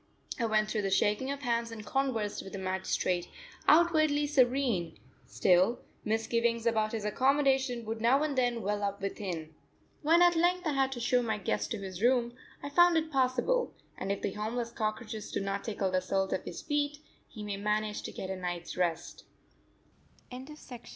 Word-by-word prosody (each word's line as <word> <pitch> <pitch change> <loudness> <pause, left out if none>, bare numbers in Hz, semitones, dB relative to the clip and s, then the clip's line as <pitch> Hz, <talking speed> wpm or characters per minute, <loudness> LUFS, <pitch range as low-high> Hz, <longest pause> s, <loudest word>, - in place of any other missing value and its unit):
I 235 - +1
went 215 -1 +2
through 215 - 0
the 195 - -1
shaking 210 +6 +1
of 280 0 -3
hands 235 -1 0
and 220 -2 -8
conversed 235 -5 -1
with 195 - -10
the - - -4
magistrate 185 -1 -1 0.4
outwardly 310 -3 +4
serene; 255 - +1 0.3
still, 185 +5 +3 0.3
misgivings 230 +1 0
about 220 -2 +1
his 220 -2 -3
accommodation 265 0 +2
would 220 +1 -4
now 260 +5 +4
and 300 -2 -1
then 245 -3 +1
well 205 +1 -1
up 200 0 -2
within. 180 -5 -4 0.5
When 335 +3 +5
at 350 -1 +5
length 355 +2 +2
I 310 - +1
had 270 -1 +1
to 245 - -6
show 245 +1 +2
my 220 -3 -1
guest 200 - -2
to 225 - -2
his 190 -2 -7
room, 240 0 +3 0.3
I 285 - -4
found 350 +2 +6
it 320 0 -1
passable, 270 - +1 0.2
and 195 - -3
if 200 - -3
the - - 0
homeless 230 +3 -3
cockroaches 215 -1 -4
do - - -1
not 195 0 -2
tickle 200 -4 -1
the 185 0 +1
soles 190 +1 0
of - - -3
his - - -7
feet, 295 -1 -1 0.3
he 215 - -9
may 205 -1 -3
manage 210 +1 -1
to - - -6
get 190 - -5
a - - -2
night's 175 -2 -5
rest. 175 -2 -2
230 Hz, 180 wpm, -30 LUFS, 200-270 Hz, 0.5 s, found